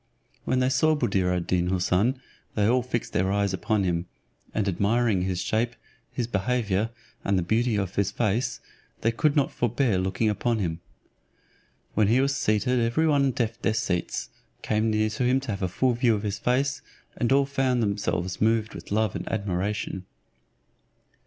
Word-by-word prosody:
When 130 0 +1
they 130 - +3
saw 155 +4 +3
Buddir 95 -10 +1
ad 90 -1 -1
Deen 90 -1 +1
Houssun, 95 +7 +1 0.4
all 115 +5 +3
fixed 120 -1 -3
their 95 +1 +1
eyes 100 -1 +1
upon 105 +1 0
him, 85 -1 -1 0.4
and 105 -2 -1
admiring 100 +2 +2
his 90 -1 -1
shape, 115 +2 0 0.4
his 120 - -2
behaviour, 110 -1 0 0.3
and 100 -1 +1
the 90 - +1
beauty 115 +5 +1
of 100 -2 -1
his 100 -1 +1
face, 115 +3 -1 0.4
they 115 - +2
could 145 +6 +1
not 140 -3 +2
forbear 120 -3 +1
looking 95 +4 0
upon 115 +2 0
him. 85 -5 -2 1.1
When 105 -1 +3
he 120 +5 +4
was 140 +1 +2
seated 110 +1 +1
every 120 +7 +2
one 140 -3 +3
deft 120 -2 -2
their 110 - +1
seats, 90 -6 -2 0.3
came 110 +1 +1
near 110 0 +2
him 125 +4 +1
to 135 -4 -4
have 100 - -4
a 95 - +1
full 125 +8 +1
view 120 -1 +3
of 105 - -4
his 105 -1 -2
face, 135 +4 0 0.4
and 120 - 0
all 140 +1 +5
found 135 -3 +1
themselves 100 -3 -1
moved 110 0 +2
with - - -10
love 110 -1 +1
and - - -4
admiration. 100 -2 -2
110 Hz, 170 wpm, -26 LUFS, 100-125 Hz, 1.1 s, all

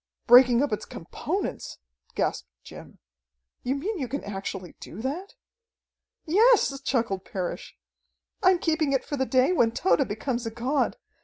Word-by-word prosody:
Breaking 245 +1 +7
up 285 - -1
its 210 - -3
components!" - - -5 0.4
gasped - - -1 0.2
Jim. - - -12 0.6
"You 255 +2 -1
mean 375 +8 -3
you 260 - -2
can 280 +4 -4
actually 195 -3 -6
do 180 - -10
that?" 300 - -5 0.9
"Yes!" 395 - +4
chuckled 230 -8 -1
Parrish. 185 -3 -5 0.6
"I'm 370 -2 +5
keeping 315 -4 0
it 270 - 0
for 290 - -3
the 265 -2 -1
day 260 +4 +3
when 240 -11 +3
Tode 290 -2 +2
becomes 235 +3 -3
a - - -1
god. 245 +6 -1
265 Hz, 145 wpm, -26 LUFS, 230-305 Hz, 0.9 s, Breaking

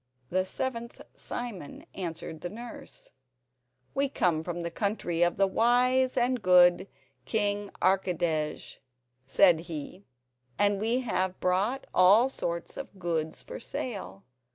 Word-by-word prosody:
The 185 +1 +1
seventh 235 +4 -4
Simon 220 -12 -6
answered 165 -3 -5
the 175 - -4
nurse: 235 +4 -10 0.8
"We 275 0 +1
come 165 - +1
from 175 0 -4
the 170 0 -4
country 175 -3 -2
of 175 0 +3
the 195 - +4
wise 250 +5 +2
and 250 -1 +1
good 180 0 +5 0.4
King 205 +3 0
Archidej," 175 -5 0 0.5
said 175 +3 +5
he, 165 +3 -7 0.5
"and 205 -1 +2
we 235 +4 +1
have 190 -6 -1
brought 200 +9 0
all 205 +8 +6
sorts 170 -9 -4
of 270 -7 -8
goods 165 -3 -2
for - - -8
sale. 190 - -5
190 Hz, 125 wpm, -28 LUFS, 175-235 Hz, 0.8 s, all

